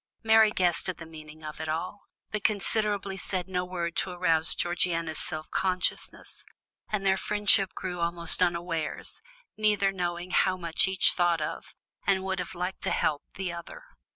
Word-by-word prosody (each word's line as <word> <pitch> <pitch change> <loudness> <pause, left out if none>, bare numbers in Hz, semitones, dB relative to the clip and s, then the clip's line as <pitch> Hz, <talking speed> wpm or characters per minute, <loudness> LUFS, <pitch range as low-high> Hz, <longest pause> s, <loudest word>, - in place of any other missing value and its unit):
Mary 220 -1 +6
guessed 180 -3 +1
at 185 - -3
the 170 - -9
meaning 155 -1 -12
of 155 +1 -7
it 160 - -4
all, 180 +6 -4 0.2
but 215 -1 -2
considerately 205 -2 0
said 185 -1 -3
no 180 -1 -1
word 175 -2 -3
to - - -1
arouse 165 -3 +1
Georgiana's 170 -2 -1
self 155 0 -4
consciousness, 185 -1 -1 0.5
and 205 -2 -1
their 190 0 +4
friendship 205 -2 +3
grew 180 -1 -4
almost 170 0 +1
unawares, 170 -2 -1 0.4
neither 210 -2 +2
knowing 175 -1 -3
how 185 0 +3
much 170 -1 +3
each 190 -1 +5
thought 175 -2 +2
of, 150 - -5 0.3
and 190 -1 +3
would 190 -1 -2
have 180 +1 -5
liked 180 +2 -4
to - - 0
help, 145 -2 +1
the 185 -2 -3
other. 170 - -9
180 Hz, 165 wpm, -28 LUFS, 170-195 Hz, 0.5 s, Mary